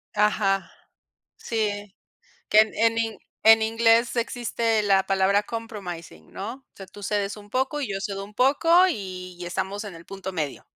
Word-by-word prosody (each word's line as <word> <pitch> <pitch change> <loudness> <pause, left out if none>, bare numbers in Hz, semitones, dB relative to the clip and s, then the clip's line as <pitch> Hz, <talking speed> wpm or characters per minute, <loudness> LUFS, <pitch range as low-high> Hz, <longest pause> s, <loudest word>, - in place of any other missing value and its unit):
Ajá. 200 -2 +1 0.7
Sí. 205 -3 -3 0.5
Que 215 - +7
en 225 +1 +2
in 225 -2 -1 0.3
en 220 0 +7
inglés 230 +2 +3
existe 230 -2 0
la 195 -2 +3
palabra 195 +1 +3
compromising, 180 - -7
¿no? 215 +5 -5
O 270 - -25
sea, 195 - -10
tú 205 +2 -13
cedes 205 0 -2
un 205 0 -14
poco, 265 +5 -1
y 265 - -3
yo 195 - -2
cedo 195 0 -4
un 210 +1 -15
poco, 275 +7 +2 0.2
y 185 - -6
estamos 200 +4 -3
en 200 - -8
el 165 0 -12
punto 195 -1 -7
medio. 150 -5 -4
205 Hz, 160 wpm, -25 LUFS, 195-225 Hz, 0.7 s, Que